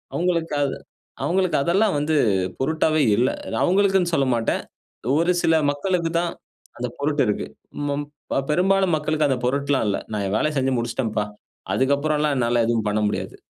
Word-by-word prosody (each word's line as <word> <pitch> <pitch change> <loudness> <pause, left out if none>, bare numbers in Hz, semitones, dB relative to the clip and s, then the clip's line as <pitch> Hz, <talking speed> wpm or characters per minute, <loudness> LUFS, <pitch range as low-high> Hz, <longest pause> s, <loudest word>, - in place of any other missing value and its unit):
அவங்களுக்கு 170 -3 0 0.7
அவங்களுக்கு 185 0 +1
அதெல்லாம் 195 +3 +2
வந்து 155 +2 0 0.4
பொருட்டாவே 155 +2 +1
இல்லை. 125 +4 +2 0.3
அவங்களுக்குனு 190 -1 +3
சொல்லமாட்டேன், 130 -6 +1 0.6
ஒரு 170 +2 +3
சில 165 - +4 0.2
மக்களுக்கு 170 +3 -1
தான் 175 -1 -1 0.5
அந்த 125 +1 -2
பொருட்டு 145 0 +1
இருக்கு. 105 - -1 0.4
மாம் 145 +1 -2 0.2
இப்ப 135 - -1
பெரும்பாலும் 190 0 +3
மக்களுக்கு 155 0 0
அந்த 130 - +1
பொருட்லாம் 140 -1 +1
இல்லை, 100 - -1
"நான் 105 -2 -2
என் 100 - -1
வேலையை 155 0 0
செஞ்சு 135 0 +1
முடிச்சிட்டேன்பா, 115 -2 -1 0.5
அதற்கு 135 +2 +3
அப்புறலாம் 150 -1 0
என்னால 120 -1 +2
எதுவும் 115 -2 0
பண்ண 105 +1 0
முடியாது." - - -3
145 Hz, 145 wpm, -23 LUFS, 125-170 Hz, 0.7 s, சில